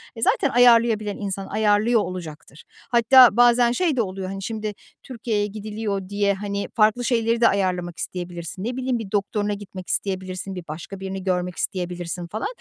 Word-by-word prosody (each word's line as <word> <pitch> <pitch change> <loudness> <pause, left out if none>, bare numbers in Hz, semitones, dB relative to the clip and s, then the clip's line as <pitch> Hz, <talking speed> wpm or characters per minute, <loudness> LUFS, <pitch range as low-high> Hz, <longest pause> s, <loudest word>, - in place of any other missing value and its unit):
e, 225 - -8
zaten - - +2
ayarlayabilen 230 -4 +4
insan 195 -1 -4
ayarlıyor 215 +2 +2
olacaktır. 160 -6 -8 0.3
Hatta 240 -1 +6
bazen 240 0 +5
şey 320 +3 +1
de 245 - +2
oluyor, 190 -2 -4
hani, 195 0 -6
şimdi, 215 -1 -4 0.3
Türkiye'ye 225 -5 -2
gidiliyor 210 -2 -4
diye, 200 0 +1
hani, 200 0 -4
farklı 220 +1 +3
şeyleri 230 -1 +1
de 230 - +7
ayarlamak 180 -3 -1
isteyebilirsin. 175 0 -6
Ne 245 +3 -3
bileyim 255 -2 -1
bir 200 -4 -7
doktoruna 205 0 -1
gitmek 195 -2 -9
isteyebilirsin, 190 0 -3
bir 180 - -6
başka 170 +5 -7
birini 190 -1 -5
görmek 180 -1 -1
isteyebilirsin 175 -1 -4
falan. 215 +5 -3
205 Hz, 160 wpm, -23 LUFS, 185-230 Hz, 0.3 s, de